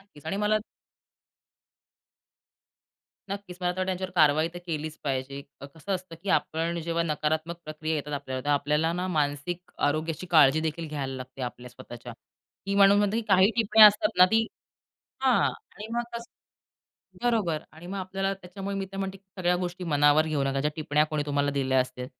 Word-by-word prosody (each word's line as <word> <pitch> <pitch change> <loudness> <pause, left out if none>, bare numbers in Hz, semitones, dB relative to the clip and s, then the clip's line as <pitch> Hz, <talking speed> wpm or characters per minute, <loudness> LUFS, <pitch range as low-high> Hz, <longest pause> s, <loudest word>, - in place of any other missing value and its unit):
नक्कीच. 175 -6 -18
आणि 175 - -2
मला 210 +1 +2 2.7
नक्कीच, 200 -3 -6
मला 180 0 +1
तर - - -14
वाटतं 185 - 0
त्यांच्यावर 185 0 -3
कारवाई 155 0 +4
तर - - -5
केलीच 155 -1 -4
पाहिजे. 140 0 -3 0.2
अ, 140 - -7
कसं 165 +5 -5
असतं 185 -2 -6
की 200 - -7
आपण 165 +2 -2
जेव्हा 170 +1 0
नकारात्मक 160 +1 -1
प्रक्रिया 155 +1 -3
येतात 150 -1 -4
आपल्यावर, 130 -2 -4
तेव्हा 145 0 +3
आपल्याला 150 +3 +1
ना, 180 +1 -2
मानसिक 155 +2 -2 0.2
आरोग्याची 155 +3 -2
काळजी 155 -2 +6
देखील 160 +1 -3
घ्यायला 140 -3 -4
लागते 130 +1 -8
आपल्या 125 0 -6
स्वतःच्या. 120 0 -10 0.5
की 200 - -1
म्हणून 200 0 +6
म्हणते 205 +1 +1
की 230 - 0
काही 190 +1 +5
टिप्पणी 220 -1 +5
असतात 210 0 +6
ना, 180 - +10
ती 225 0 +3 0.8
हां. 260 -3 +4 0.3
आणि 210 - -7
मग 240 - 0
कसं 235 0 -7 0.9
बरोबर. 210 -10 +1
आणि 160 +2 -12
मग 195 +2 -5
आपल्याला 195 +1 -2
त्याच्यामुळे 195 +2 -6
मी 195 0 -3
तर - - -7
म्हणते 195 0 -3
की 195 - -39 0.2
सगळ्या 180 0 +2
गोष्टी 180 0 -4
मनावर 145 +2 +5
घेऊ 155 -3 0
नका. 135 0 0
ज्या 150 +2 0
टिपण्या 150 -1 +2
कोणी 155 -1 0
तुम्हाला 145 0 +1
दिल्या 135 -2 +1
असतील. 125 0 -4
165 Hz, 180 wpm, -27 LUFS, 145-190 Hz, 2.7 s, ना